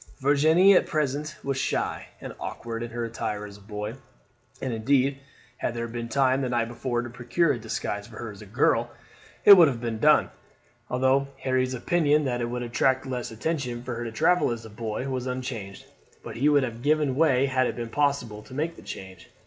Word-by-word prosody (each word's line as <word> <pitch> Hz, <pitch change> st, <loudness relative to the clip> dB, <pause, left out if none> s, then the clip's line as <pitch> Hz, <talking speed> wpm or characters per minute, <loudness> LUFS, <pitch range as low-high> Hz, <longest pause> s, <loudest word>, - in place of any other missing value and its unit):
Virginie 155 Hz, +8 st, +5 dB
at -, -, +4 dB
present 150 Hz, +1 st, -1 dB
was 135 Hz, -1 st, -1 dB
shy -, -, -2 dB
and -, -, -7 dB
awkward 115 Hz, -1 st, -5 dB
in 120 Hz, -, -4 dB
her 120 Hz, 0 st, -3 dB
attire 105 Hz, -2 st, -4 dB
as 100 Hz, -1 st, -11 dB
a -, -, -18 dB
boy, 105 Hz, +1 st, -5 dB, 0.7 s
and 130 Hz, -3 st, -3 dB
indeed 135 Hz, +4 st, +1 dB, 0.4 s
had 120 Hz, -, -2 dB
there 115 Hz, 0 st, -3 dB
been 115 Hz, 0 st, -5 dB
time 135 Hz, +1 st, +2 dB
the 130 Hz, -, -1 dB
night 120 Hz, -2 st, 0 dB
before 120 Hz, 0 st, -2 dB
to 120 Hz, -, -6 dB
procure 125 Hz, +7 st, +1 dB
a 120 Hz, -, -5 dB
disguise 110 Hz, -1 st, -4 dB
for -, -, -12 dB
her -, -, -6 dB
as -, -, -13 dB
a -, -, -11 dB
girl -, -, +2 dB, 0.6 s
it 200 Hz, -, +12 dB
would 170 Hz, -4 st, +7 dB
have 130 Hz, -4 st, -2 dB
been 115 Hz, -2 st, -3 dB
done, 150 Hz, +5 st, +4 dB, 0.6 s
although 130 Hz, +2 st, +2 dB, 0.2 s
Harry's 130 Hz, -1 st, +1 dB
opinion 150 Hz, +1 st, +2 dB
that 120 Hz, -2 st, -1 dB
it 120 Hz, -, -2 dB
would 125 Hz, 0 st, -3 dB
attract 130 Hz, +2 st, +1 dB
less 125 Hz, -2 st, -4 dB
attention 120 Hz, 0 st, -3 dB
for 125 Hz, -, -4 dB
her 120 Hz, +1 st, -4 dB
to 115 Hz, -, -5 dB
travel 165 Hz, +9 st, +3 dB
as 115 Hz, -1 st, -4 dB
a 110 Hz, -, -10 dB
boy 110 Hz, +4 st, -4 dB
was 130 Hz, -1 st, -3 dB
unchanged; 125 Hz, -6 st, -5 dB, 0.4 s
but -, -, -8 dB
he 140 Hz, +5 st, +3 dB
would 145 Hz, -2 st, +4 dB
have 120 Hz, -2 st, -5 dB
given 150 Hz, -1 st, +2 dB
way 140 Hz, -3 st, +3 dB
had 130 Hz, -2 st, +1 dB
it -, -, -3 dB
been 120 Hz, -1 st, -5 dB
possible 140 Hz, -7 st, 0 dB
to 130 Hz, +4 st, -12 dB
make 160 Hz, +4 st, -2 dB
the -, -, -13 dB
change. 95 Hz, -2 st, -9 dB
125 Hz, 210 wpm, -26 LUFS, 115-140 Hz, 0.7 s, it